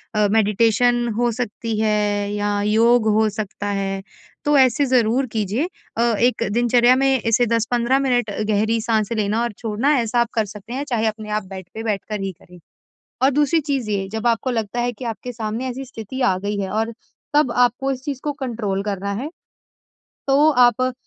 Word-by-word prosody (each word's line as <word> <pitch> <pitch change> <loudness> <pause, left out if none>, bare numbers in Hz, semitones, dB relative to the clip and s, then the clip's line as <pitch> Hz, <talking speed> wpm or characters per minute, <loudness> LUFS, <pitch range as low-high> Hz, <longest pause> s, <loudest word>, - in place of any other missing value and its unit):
अ, 210 -1 +3
meditation 230 +3 +2
हो 240 0 +2
सकती 225 -1 -4
है 215 -1 +2 0.4
या 205 0 -1
योग 225 +2 +3
हो 220 0 +3
सकता 205 -1 -5
है, 195 -1 -1 0.5
तो 295 0 +4
ऐसे 260 +1 +4
ज़रूर 250 0 +2
कीजिए। 220 - -1 0.3
अ, - - +2 0.2
एक 245 +1 +2
दिनचर्या 240 +2 +4
में 270 +1 +2
ऐसे 230 +1 +2
10-15 235 +3 +1
मिनट 245 -4 +1
अ, 205 - -4
गहरी 220 +2 +1
साँस 220 -1 0
लेना 210 +2 0
और 240 - -2
छोड़ना, 230 +6 0
ऐसा 235 +1 0
आप 235 -1 +2
कर 220 -2 +1
सकते 210 +4 -10
हैं, 275 +2 -2
चाहे 230 -3 0
अपने 215 0 -4
आप 210 0 -1
बेड 190 -2 -8
पे 225 - -6
बैठ 210 -4 -1
कर 210 -2 -3
ही 195 - -2
करें। 180 0 -18 0.7
और 270 - +5
दूसरी 295 +3 +2
चीज़ 275 -7 -2
ये, 195 -2 -1
जब 220 +1 -3
आपको 235 +2 +1
लगता 230 0 -2
है 245 0 0
कि 240 +2 -9
आपके 235 +2 -5
सामने 225 +2 -4
ऐसी 260 +2 -5
स्थिति 245 +1 -8
आ 190 -6 +3
गई 205 +2 -3
है 190 - -3
और 225 +2 -1 0.4
तब 295 -5 +3
आपको 245 +2 +2
इस 260 -1 -6
चीज़ 275 -3 -4
को 295 - 0
कंट्रोल 230 -8 -3
करना 200 -1 -3
है, 285 - -4 1.0
तो 285 +3 +5
आप 255 -1 +3
230 Hz, 195 wpm, -21 LUFS, 210-250 Hz, 1.0 s, और